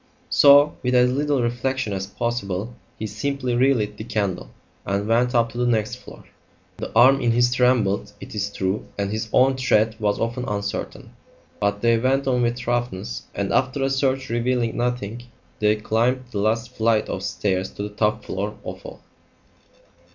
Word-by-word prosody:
So, 145 +1 +6
with 125 0 0
as 125 0 +5
little 140 -1 0
reflection 120 -1 -1
as 95 0 -3
possible, 105 -1 -3 0.2
he 110 - -4
simply 125 +4 -2
relit 120 -5 +2
the 110 - -6
candle 105 -5 -2 0.3
and 100 +1 -2
went 120 +2 +2
up 115 -1 +2
to 120 - -7
the 125 - +1
next 115 +1 0
floor. - - -13 0.5
The - - -6
arm 130 +4 +6
in 120 -1 +2
his 120 +1 +3
trembled, 125 -6 +2
it - - -10
is 105 -1 -2
true, 95 +1 -2
and 100 0 -2
his 110 +1 -3
own 130 +1 +4
tread 110 -4 +2
was 105 -1 0
often 120 +2 -2
uncertain, 100 0 -4 0.5
but 100 0 0
they 115 -1 +4
went 135 +3 +1
on 125 -2 +2
with 120 0 0
thoroughness, 120 - -3
and - - -2
after 135 +1 +1
a 135 - +1
search 135 -1 0
revealing 120 0 0
nothing 120 -2 -2 0.4
they 105 0 +3
climbed 115 +4 0
the 105 - -3
last 115 +3 0
flight 110 -1 +1
of 95 - -4
stairs 95 -1 -1
to 100 - -5
the 105 - -4
top 105 +1 -1
floor 100 +3 -4
of - - -7
all. - - -10
115 Hz, 175 wpm, -23 LUFS, 105-125 Hz, 0.5 s, So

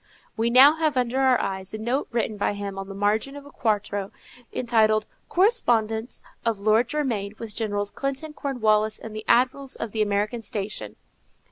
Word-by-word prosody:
We 230 +1 +1
now 270 +6 +7
have 310 -4 0
under 250 +1 +1
our 260 -2 +4
eyes 190 +1 -4
a - - -4
note 240 +6 -1
written 230 -2 -1
by 205 0 0
him 200 -1 -5
on 195 - -6
the 195 - -7
margin 215 +7 0
of 285 0 -10
a 285 - -13
quarto 205 -4 -1 0.4
entitled 220 -3 +2 0.2
_Correspondence 240 - +2 0.2
of 230 -3 0
Lord 215 +4 +3
Germain 225 -9 -2
with 220 -2 -8
Generals 205 -2 -1
Clinton, 275 +3 -4
Cornwallis, 215 -7 +1
and 220 -1 -9
the 215 - -5
Admirals 260 +2 +2
on 230 - -4
the 220 - -1
American 210 +3 0
station. 200 - -4
220 Hz, 170 wpm, -25 LUFS, 205-255 Hz, 0.4 s, now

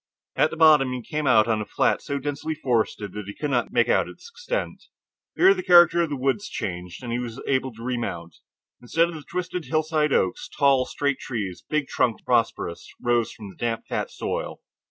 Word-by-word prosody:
At - - +3
the - - -7
bottom 150 -5 +5
he 125 -1 -5
came 150 +4 -3
out 110 -3 +5
on 110 -2 +1
a - - -4
flat, - - +1
so 140 - -3
densely 145 +3 -3
forested 115 -7 -1
that 105 -2 -6
he 105 - -7
could 150 -2 -3
not 120 -2 0
make - - +3
out - - +2
its - - -13
extent. 485 +2 -4 0.5
Here 380 +2 +6
the 370 - -4
character 175 - +6
of 165 - 0
the 145 - -2
woods 135 +11 -1
changed, 90 +3 -5
and 120 -1 -4
he 120 - -1
was 120 0 -6
able 130 -1 0
to 115 +1 -11
remount. 100 -10 -4 0.4
Instead 165 +8 +1
of - - -7
the 155 - -7
twisted 175 +1 -4
hillside 155 -1 +1
oaks, 95 -8 0
tall 135 -3 +3
straight 140 -1 -1
trees, 105 -8 -5
big 150 -2 0
trunked 115 -3 0
and - - -38
prosperous, 115 -8 0
rose 120 -1 +1
from 105 -2 -10
the - - -18
damp 115 -1 -3
fat - - -3
soil. - - -4
130 Hz, 210 wpm, -24 LUFS, 115-155 Hz, 0.5 s, Here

